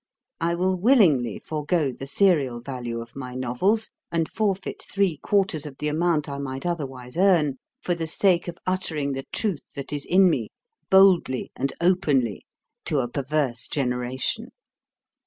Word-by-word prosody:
I 170 0 +1
will 185 +2 +1
willingly 175 - +4
forgo 150 -1 -1
the 135 +2 -8
serial 140 -8 +2
value 120 -2 -5
of 115 0 -12
my 125 -2 -6
novels, 130 - 0 0.2
and 165 -1 0
forfeit 200 -3 -2
three 195 -6 0
quarters 185 -4 0
of 135 -2 -10
the 150 - -2
amount 160 0 +1
I 140 -1 -5
might 135 0 -5
otherwise 135 -6 -4
earn, 170 -8 +3 0.2
for 175 - -1
the 165 -1 -3
sake 175 +1 +2
of 170 -1 -5
uttering 160 -6 -1
the 135 0 -5
truth 200 -10 -1
that 140 +1 -6
is 145 -1 -4
in 190 +1 +6
me, 125 -11 0 0.4
boldly 190 -9 +4
and 135 +1 -1
openly, 150 - +1 0.4
to 150 - 0
a 125 -3 +1
perverse 135 -1 -1
generation. 130 - -2
150 Hz, 155 wpm, -25 LUFS, 130-180 Hz, 0.4 s, in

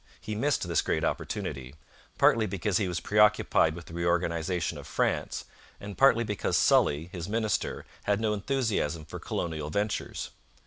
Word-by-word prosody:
He 110 - -5
missed 130 -2 0
this 85 -3 +2
great - - -1
opportunity; 65 +1 -3 0.4
partly 110 -1 +4
because 100 -1 0
he 100 - 0
was 90 -1 -2
preoccupied 105 -6 +3
with 85 -1 -9
the - - -12
reorganization 85 0 0
of - - -10
France, - - -1 0.3
and 100 -1 -7
partly 125 -4 +5
because 105 -3 -1
Sully, 75 +4 +3
his 85 -1 -6
minister, 110 -1 -1 0.2
had 100 0 +2
no 110 -1 +1
enthusiasm 105 - -1
for - - -8
colonial 80 -3 -3
ventures. 105 +6 -2
95 Hz, 150 wpm, -28 LUFS, 85-105 Hz, 0.4 s, partly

